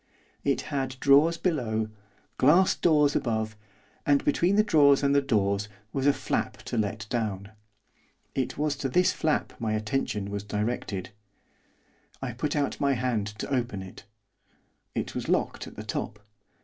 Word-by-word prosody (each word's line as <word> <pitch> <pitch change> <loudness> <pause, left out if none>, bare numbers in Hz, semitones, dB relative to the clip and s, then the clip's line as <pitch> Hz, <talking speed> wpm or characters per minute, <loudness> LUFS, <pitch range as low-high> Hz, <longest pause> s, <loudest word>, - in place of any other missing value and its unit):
It - - +1
had 135 -2 -1
drawers 150 +5 +5
below, 115 - -1 0.5
glass 170 +8 +5
doors 150 -4 +3
above, 110 -3 -1 0.5
and 145 -1 +2
between 175 +6 +2
the 210 - +5
drawers 145 -9 +5
and 140 0 +3
the 140 - +4
doors 100 -6 0 0.2
was 135 0 0
a - - +7
flap - - -2
to - - -5
let 105 -1 -1
down. 105 -4 -2 0.8
It 130 -2 -2
was 150 0 0
to 135 - -2
this 180 +7 +3
flap 155 -2 0
my 110 -2 -1
attention 105 -2 -2
was 100 -1 -3
directed. 105 -2 -3 1.1
I 135 -2 -4
put 145 +6 -2
out 145 -1 -1
my 140 -1 +3
hand 120 -5 -1
to 105 +6 -5
open 120 -7 -1
it; 95 - -12 0.9
it - - -2
was - - -4
locked - - 0
at - - -11
the - - -7
top. 105 - -4
130 Hz, 155 wpm, -27 LUFS, 105-145 Hz, 1.1 s, a